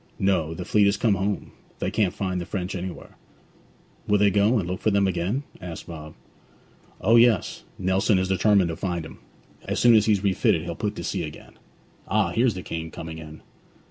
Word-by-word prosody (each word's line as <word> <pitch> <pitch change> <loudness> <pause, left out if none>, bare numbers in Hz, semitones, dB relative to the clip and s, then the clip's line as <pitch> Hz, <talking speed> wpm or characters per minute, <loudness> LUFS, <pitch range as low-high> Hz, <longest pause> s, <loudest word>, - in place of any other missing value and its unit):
'No. 85 -5 +1
The 90 +1 -6
fleet 105 +1 +4
is 100 - +2
come 115 -3 +2
home; 100 +1 -2 0.3
they - - -2
can't 105 -4 +1
find 95 -2 -3
the - - -5
French 90 -2 -3
anywhere.' 90 0 -7 0.9
'Will 105 - +4
they 100 0 +4
go 105 +5 +3
and 95 -5 -1
look 90 +1 -4
for - - +2
them 100 -1 +2
again?' 95 +8 -1 0.2
asked 85 -2 -7
Bob. 80 -2 -9 0.9
'O 115 +1 +5
yes. 115 -4 +3 0.2
Nelson 95 +2 +2
is 95 0 0
determined 95 -1 +3
to 80 - -3
find 85 -2 -3
'em. 80 - -12 0.5
As - - -2
soon 120 -1 +6
as 110 -1 +5
he's 105 -3 +2
refitted 95 -4 +2
he'll 85 0 -4
put 105 +4 -3
to - - -6
sea - - -2
again. - - -8 0.5
Ah, - - +2
here's 115 -3 +2
the 90 - -6
King 80 0 -5
coming 80 0 -8
in.' 80 -1 -11
95 Hz, 200 wpm, -25 LUFS, 85-105 Hz, 0.9 s, soon